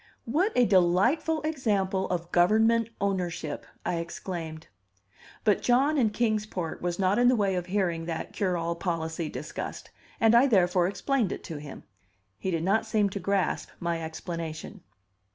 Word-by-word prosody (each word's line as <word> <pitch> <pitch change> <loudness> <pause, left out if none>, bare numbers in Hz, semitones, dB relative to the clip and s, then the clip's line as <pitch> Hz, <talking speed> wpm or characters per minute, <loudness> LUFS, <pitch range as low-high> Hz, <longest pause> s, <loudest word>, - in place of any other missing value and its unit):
"What 330 - +1
a 250 - +5
delightful 200 - +3
example 205 -11 0
of 175 -1 -3
government 220 +5 +4
ownership!" 180 -6 -2 0.2
I 175 - 0
exclaimed. 165 -1 -5 0.8
But 210 -3 +3
John 270 +5 +3
in 245 -7 +3
Kings 215 -1 0
Port 175 -6 -4
was 175 0 -2
not 195 +3 +2
in 245 - +5
the 250 - +5
way 200 -4 +1
of 180 -1 -2
hearing 180 -4 0
that 165 -1 -4
cure 185 -3 0
all 170 0 -1
policy 165 -2 -3
discussed, - - -6 0.3
and 225 0 +5
I 240 +4 +6
therefore 180 -6 +3
explained 230 +1 0
it - - -5
to 160 - -6
him. 145 -1 -9 0.6
He - - -2
did 165 -3 -1
not 220 +5 +2
seem 210 -3 +1
to 200 - -4
grasp 195 +1 0
my 170 -1 -2
explanation. 165 +3 -6
190 Hz, 160 wpm, -28 LUFS, 170-220 Hz, 0.8 s, I